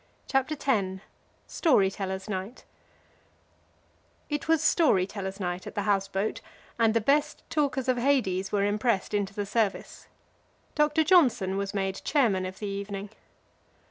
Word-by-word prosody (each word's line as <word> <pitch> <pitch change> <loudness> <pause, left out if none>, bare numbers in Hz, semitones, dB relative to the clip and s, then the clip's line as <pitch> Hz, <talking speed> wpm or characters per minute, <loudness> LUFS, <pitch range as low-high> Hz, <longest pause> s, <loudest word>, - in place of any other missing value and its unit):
CHAPTER 270 +3 0
X: 195 -8 0 0.4
STORY 205 - +2
TELLERS' 190 -1 -5
NIGHT 195 +4 -5 1.7
It 295 +1 -2
was 325 -1 +3
Story 300 - +4
tellers' 195 0 -6
Night 180 -1 -3
at - - -9
the 205 - -1
house 195 -1 +1
boat, 205 +4 -2 0.4
and 225 -1 +3
the - - +5
best 290 +6 +1
talkers 280 -4 0
of 255 -1 +2
Hades 235 -8 +1
were 200 -1 +1
impressed 210 0 0
into 200 -1 -1
the 205 - -2
service. 210 -1 -2 0.7
Doctor 300 +1 +2
Johnson 265 - +3
was 200 +1 -3
made 195 -1 -2
chairman 210 -11 +2
of 185 - -9
the 210 - -6
evening. 200 0 -5
205 Hz, 140 wpm, -27 LUFS, 195-265 Hz, 1.7 s, the